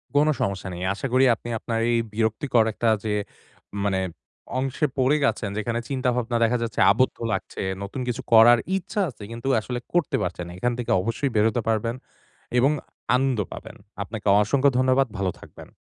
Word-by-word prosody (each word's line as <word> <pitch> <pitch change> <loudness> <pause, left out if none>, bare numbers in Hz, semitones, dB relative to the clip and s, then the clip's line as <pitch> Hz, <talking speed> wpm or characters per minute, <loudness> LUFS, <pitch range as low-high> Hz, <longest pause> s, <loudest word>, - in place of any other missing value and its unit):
কোন 145 +1 +5
সমস্যা 100 -1 -2
নেই। 85 - -7
আশা 105 +7 -4
করি 130 +1 +5
আপনি 120 - -9
আপনার 115 -1 -2
এই 120 - +3 0.2
বিরক্তিকর 115 +3 +2
একটা 115 - -1 0.2
যে, 110 - -2 0.7
মানে 95 -2 +1 0.6
অংশে 135 +3 0
পড়ে 130 +3 +3 0.2
আছেন। 105 -2 -5
যেখানে 115 +2 -1
চিন্তাভাবনা 125 -3 0
দেখা 120 +2 +2
যাচ্ছে 115 - -4
আবদ্ধ 130 - +1 0.2
লাগছে, - - -4 0.2
নতুন 105 +6 -5
কিছু 125 +2 -2
করার 115 +1 +8 0.2
ইচ্ছা 205 +3 -3
আছে 110 -4 -12
কিন্তু 115 +3 -6
আসলে 125 +2 -4
করতে 165 -4 +1
পারছেন 90 0 -3
না। - - -9
এখান 120 +4 0
থেকে 120 - -2
অবশ্যই 115 +7 -1
বেরোতে 110 +2 +2
পারবেন 115 +1 0 0.6
এবং 135 +4 +4 0.4
আনন্দ 130 -2 +1
পাবেন। - - -9 0.3
আপনাকে 105 0 -7
অসংখ্য 135 +6 +3
ধন্যবাদ। 130 +1 +3
ভালো 95 -2 0
থাকবেন। - - -13
120 Hz, 165 wpm, -24 LUFS, 110-130 Hz, 0.7 s, করার